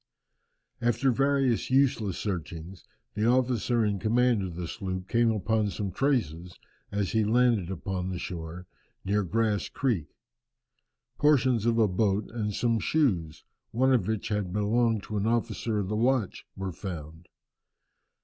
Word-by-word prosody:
After 120 +3 +2
various 135 -2 +1
useless 125 -8 +2
searchings, 85 -2 -5 0.3
the 105 +2 0
officer 120 -2 +2
in 100 -2 0
command 120 +1 +2
of 90 -3 -5
the 85 -1 -4
sloop 95 -1 -5
came 115 +2 +3
upon 110 0 +1
some 100 +1 -4
traces, 90 - -1 0.3
as 100 -2 -1
he 110 -1 +2
landed 115 -4 +2
upon 95 0 -3
the 90 - -3
shore, 85 0 -6 0.4
near 105 +2 +1
Grass 105 +2 0
Creek. 115 - -1 1.1
Portions 130 -6 +3
of 115 -1 +2
a 110 -2 +4
boat 100 +1 0
and 110 -3 -2
some 115 -2 +1
shoes, 95 - 0 0.3
one 130 +3 +2
of 115 -8 +2
which 110 0 -2
had 105 -4 -1
belonged 110 +2 +1
to 105 - -4
an 100 +2 0
officer 115 -1 -1
of 100 -2 -1
the 105 - -2
watch, 120 -2 0
were 95 -1 -4
found. 80 -2 -8
105 Hz, 145 wpm, -28 LUFS, 95-120 Hz, 1.1 s, a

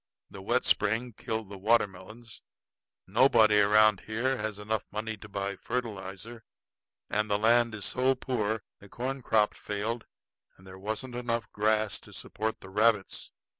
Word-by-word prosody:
The 100 - -9
wet 120 +6 +1
spring 110 +4 +2
killed 110 0 -4
the 100 -1 -8
watermelons. 110 +1 -1 0.6
Nobody 110 -1 +5
around 105 0 +5
here 120 +5 0
has 110 -2 -3
money 110 +1 -3
enough 110 - -7
to 105 - -10
buy 100 0 -3
fertilizer; 110 -1 -5 0.6
and 105 +1 0
land 115 +2 +3
is 105 -2 -5
so 130 +5 +2
poor 110 -5 -2 0.2
the 100 - -15
corn 130 +5 -4
crop 110 -3 +2
failed 110 +3 -4 0.5
and 95 - -18
there 95 0 -11
wasn't 110 +5 -4
enough 120 -2 -2
grass 110 0 +1
to - - -15
support 110 +1 -4
the 95 - -11
rabbits. 105 -1 +1
110 Hz, 145 wpm, -29 LUFS, 105-115 Hz, 0.6 s, Nobody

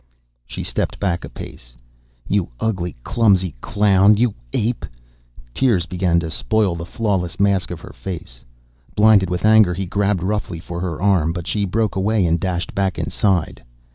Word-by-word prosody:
She - - -6
stepped - - -2
back 90 -4 -1
a - - -7
pace. - - -11 0.5
"You 100 -4 0
ugly, 90 - -2
clumsy 95 -7 +2
clown. 100 0 +4
You 120 -1 +2 0.2
ape!" 115 - -1 0.7
Tears 105 - +2
began 90 -2 +1
to 80 -1 -5
spoil 105 +1 +1
the 85 0 -6
flawless 95 -5 -2
mask 100 -2 +2
of 85 -2 -7
her - - -11
face. 85 -10 -7 0.5
Blinded 105 -3 +5
with 90 +2 -1
anger, 110 -5 +5
he 95 +2 -3
grabbed 100 -1 0
roughly 100 -3 -2
for 85 0 -6
her 90 -3 -3
arm, 90 -5 +2
but 85 -2 -5
she 105 -2 -1
broke 105 +2 -1
away 100 0 +1
and 85 0 +1
dashed 90 0 -3
back 95 -2 -1
inside. 95 -6 0
95 Hz, 165 wpm, -20 LUFS, 85-105 Hz, 0.7 s, Blinded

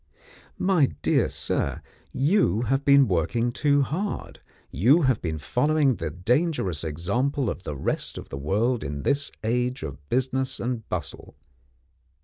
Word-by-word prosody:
My 185 -7 +3 0.2
dear - - +2
sir, 70 - -2 0.3
you 135 - +2
have 135 +4 0
been 140 -2 +6
working 110 +7 0
too 145 +2 +2
hard; 185 +10 -4 0.3
you 130 - +4
have 130 -5 +2
been 80 -2 -2
following 140 - +1
the 80 - -3
dangerous 95 - 0
example 105 - -1
of - - -7
the 75 - -4
rest - - -2
of - - -8
the 70 - -6
world 110 - 0
in 70 0 -5
this 140 0 0
age 125 +1 -1
of 70 -1 -8
business 130 +1 0
and 120 -2 -3
bustle. - - -5
125 Hz, 140 wpm, -25 LUFS, 85-140 Hz, 0.3 s, been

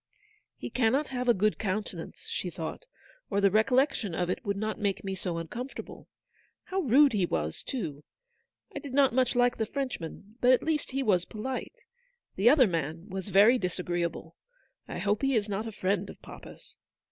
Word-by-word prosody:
"He - - -6
cannot 255 +5 +2
have 250 -1 -2
a - - +7
good 210 +2 +1
countenance/' 210 0 -4
she - - -3
thought, - - -6 0.5
u 200 - 0
or - - +5
the 200 -1 +4
recollection 220 - +2
of 180 +1 0
it - - -4
would 200 -3 -1
not 215 +1 -2
make 200 -2 -1
me 195 -1 -3
so 180 -2 -3
uncomfortable. 240 - -7 0.6
How 380 0 -2
rude 280 -3 +5
he 190 -4 +2
was, 80 - -2
too! 160 - -4 0.7
I - - -2
did 275 -3 -7
not 275 -4 +5
much 255 -1 +2
like 245 0 +3
the 220 - -1
Frenchman, 225 - -5
but 250 +1 +6
at 255 - +2
least 310 -2 -1
he 270 +1 -1
was 185 -6 +2
polite. 255 - -5 0.6
The 205 +5 +5
other 275 -1 +6
man 165 0 -3
was 190 +1 -5
very 210 +6 +6
dis 180 -4 -2
agreeable. 170 -2 -3 0.5
I - - -5
hope 205 0 0
he 270 -1 +2
is 215 -2 +1
not 205 +2 -3
a - - -5
friend 195 -1 -1
of - - -11
papa's." - - -12
215 Hz, 190 wpm, -29 LUFS, 185-255 Hz, 0.7 s, a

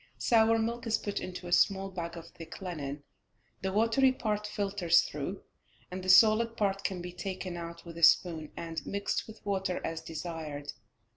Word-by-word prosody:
Sour 225 -1 +4
milk 230 +1 -2
is 225 - +2
put 205 - -3
into 180 0 -7
a 175 - -6
small 195 +1 +3
bag 170 -2 -5
of 170 0 -9
thick 165 -1 -10
linen, 150 -7 -5 0.6
the 190 - -1
watery 230 +6 +4
part 210 -4 -2
filters 195 -5 +2
through, 150 +7 -5 0.5
and 185 +1 -4
the 185 - -3
solid 225 +4 +6
part 195 -1 0
can 180 -2 -2
be 175 0 -7
taken 185 0 -5
out 170 0 -7
with 170 -1 -9
a - - -8
spoon, 165 -2 +4
and 165 -1 -5
mixed 200 0 -2
with 220 -1 -13
water 195 -2 -1
as 165 0 -3
desired. 160 -3 -6
185 Hz, 175 wpm, -30 LUFS, 170-210 Hz, 0.6 s, solid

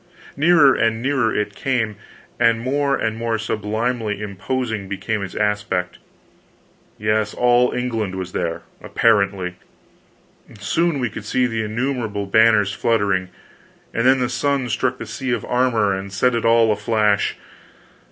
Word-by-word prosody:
Nearer 150 -2 +5
and 115 0 +1
nearer 130 -2 +1
it 105 -1 -2
came, 115 -3 -1 0.4
and 115 -1 +3
more 140 +3 0
and 110 0 -1
more 115 -1 -1
sublimely 110 0 -2
imposing 105 +1 -3
became 105 +2 -3
its 95 -1 -6
aspect; 105 -3 -1 1.0
yes, 105 0 0
all 125 0 +3
England 115 -6 -2
was 95 -1 -5
there, 85 0 -3 0.2
apparently. 100 -5 +1 1.0
Soon 165 +9 0
we 125 -4 -2
could 110 - -7
see 125 +4 +1
the 115 -2 -1
innumerable 110 -2 -2
banners 105 -1 +4
fluttering, 100 -4 0 0.6
and 115 +2 +1
then 135 +1 +5
the 125 - +1
sun 130 +1 -1
struck 125 +3 0
the - - -7
sea 130 -2 -4
of 115 - -3
armor 120 -5 +1
and 95 +1 -5
set 125 +6 +1
it 115 -1 -1
all 115 -2 +4
aflash. 105 -1 +1
110 Hz, 140 wpm, -21 LUFS, 105-125 Hz, 1.0 s, Nearer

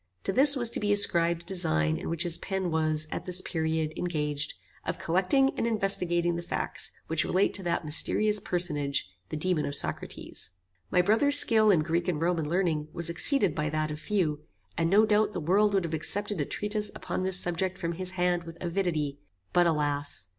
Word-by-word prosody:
To 195 - -2
this 280 +4 +6
was 240 -3 +3
to - - -3
be 205 0 -1
ascribed 170 -4 +4
a - - -27
design 80 - 0
in - - -7
which 165 +1 -1
his 170 -2 0
pen 190 -3 -4
was, 155 -1 0
at - - -6
this 180 0 -3
period, 160 -2 -3
engaged, 150 -4 -3 0.3
of - - -4
collecting 195 +11 +1
and 230 - -2
investigating 180 -5 0
the 170 - -4
facts 170 - -4
which 160 -1 -1
relate 190 +2 0
to 200 - -2
that 170 -1 -2
mysterious 210 +7 +3
personage, 150 - -1 0.2
the 155 - -5
Daemon 175 0 -1
of 140 - -4
Socrates. 90 - -2 0.3
My 180 - +2
brother's 255 +9 +7
skill 220 -6 +8
in 180 -6 +3
Greek 170 +2 -2
and 170 -5 -2
Roman 165 -2 -1
learning 165 -4 -1
was 170 0 -1
exceeded 200 - +2
by 150 -1 -3
that 155 0 -3
of 150 - -7
few, 165 -6 -2 0.4
and 165 0 -1
no 210 +4 +4
doubt 210 -1 +1
the 180 - -4
world 200 +6 +1
would 190 - +1
have 165 - -6
accepted 200 +4 -2
a - - -2
treatise 210 +3 -3
upon - - -5
this 185 0 +2
subject 180 +2 -3
from 170 -2 -4
his 180 +2 -5
hand 175 -1 0
with 165 0 -11
avidity; 170 -6 -3 0.3
but 175 -1 +3
alas! 145 - -2
175 Hz, 195 wpm, -27 LUFS, 155-195 Hz, 0.4 s, skill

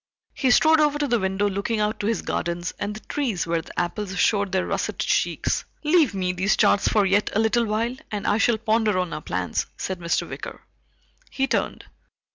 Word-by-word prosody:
He 265 - 0
strode 315 +5 +5
over 295 -1 +3
to 295 -1 0
the 240 -2 +2
window 190 +1 0
looking 200 +3 -2
out 210 0 0
to 205 - -2
his 230 - -1
gardens 175 +1 -2
and 205 +1 -3
the 215 - -9
trees 240 - -2
where 165 0 0
the - - -6
apples 190 +2 -3
showed 200 0 +2
their 190 -1 +1
russet - - -2
cheeks. - - 0 0.2
"Leave 300 - +3
me 185 -1 0
these 190 +4 +1
charts 205 -2 +3
for 210 -2 +3
yet 200 +2 +2
a - - +3
little 225 +2 +2
while, 225 +3 -1
and 210 -2 -4
I 205 - +2
shall 235 0 +3
ponder 220 -2 +1
on 180 -2 -1
our - - -4
plans," 90 -6 -2
said 190 -1 -4
Mr. 170 -1 -1
Wicker. - - -8 0.7
He 270 - 0
turned. - - -2
210 Hz, 205 wpm, -24 LUFS, 190-230 Hz, 0.7 s, strode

